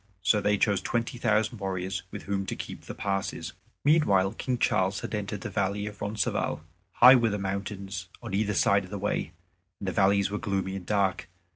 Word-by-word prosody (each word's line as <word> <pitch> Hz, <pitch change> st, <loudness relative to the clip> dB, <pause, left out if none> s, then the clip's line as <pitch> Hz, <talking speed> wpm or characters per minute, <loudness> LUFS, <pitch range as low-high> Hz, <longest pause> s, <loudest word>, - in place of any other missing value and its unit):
So 105 Hz, +2 st, +3 dB
they 105 Hz, +1 st, +2 dB
chose 100 Hz, -2 st, +2 dB
twenty 120 Hz, +1 st, -2 dB
thousand 110 Hz, 0 st, +1 dB
warriors 95 Hz, -1 st, -3 dB
with -, -, -7 dB
whom 100 Hz, -1 st, -2 dB
to -, -, -2 dB
keep -, -, -8 dB
the -, -, -7 dB
passes. 100 Hz, -1 st, -3 dB, 0.3 s
Meanwhile 100 Hz, -12 st, +4 dB
King 125 Hz, -1 st, -2 dB
Charles 95 Hz, -4 st, +1 dB
had -, -, -6 dB
entered 105 Hz, -1 st, -3 dB
the 115 Hz, -, -5 dB
valley 100 Hz, +1 st, -1 dB
of 105 Hz, -1 st, -8 dB
Roncesvalles. 105 Hz, -6 st, -1 dB, 0.3 s
High 125 Hz, +2 st, +9 dB
were 120 Hz, -3 st, +4 dB
the 105 Hz, -, -1 dB
mountains 100 Hz, -1 st, -4 dB
on 115 Hz, -4 st, -7 dB
either 105 Hz, 0 st, +1 dB
side 100 Hz, +1 st, +3 dB
of 90 Hz, -, -11 dB
the 100 Hz, -, -4 dB
way, 100 Hz, -5 st, -2 dB, 0.5 s
and 100 Hz, -, -5 dB
the -, -, +1 dB
valleys 100 Hz, +1 st, +3 dB
were 105 Hz, -, -2 dB
gloomy 95 Hz, -3 st, -2 dB
and 95 Hz, -2 st, -7 dB
dark. 100 Hz, -3 st, 0 dB
100 Hz, 195 wpm, -28 LUFS, 95-105 Hz, 0.5 s, High